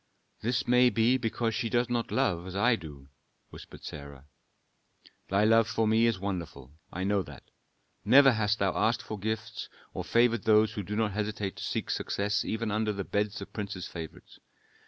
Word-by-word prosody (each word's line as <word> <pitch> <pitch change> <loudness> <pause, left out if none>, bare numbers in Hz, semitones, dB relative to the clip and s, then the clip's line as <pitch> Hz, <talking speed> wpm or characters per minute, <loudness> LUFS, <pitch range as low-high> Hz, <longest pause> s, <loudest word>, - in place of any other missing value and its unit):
"This 120 +1 -1
may 125 0 +5
be 115 +3 +3
because 115 -1 -1
she 115 0 -2
does 120 0 +1
not 120 -1 -1
love 90 -10 0
as 95 - -7
I 115 +5 +3
do," 70 -7 -11 0.4
whispered - - -12
Sarah. 70 -1 -9 1.0
"Thy 100 +2 +2
love 115 0 +5
for 115 -1 0
me 110 +2 +4
is 115 -3 +1
wonderful, 85 -9 -5 0.2
I 95 - -4
know 100 0 +1
that. - - -12 0.5
Never 135 +1 +7
hast 110 -2 +1
thou 95 -3 0
asked 110 +3 +1
for 110 - -6
gifts, 110 +3 -4 0.2
or - - -4
favored 115 0 +2
those 110 0 +4
who 105 - -3
do 100 +2 -5
not 110 -1 +1
hesitate 105 -1 -3
to - - -6
seek - - -2
success 100 0 -1
even 110 0 -2
under 110 0 0
the 100 -1 -4
beds 105 +2 -2
of - - -14
princes' 100 -4 -5
favorites. 80 -2 -10
110 Hz, 180 wpm, -29 LUFS, 100-115 Hz, 1.0 s, Never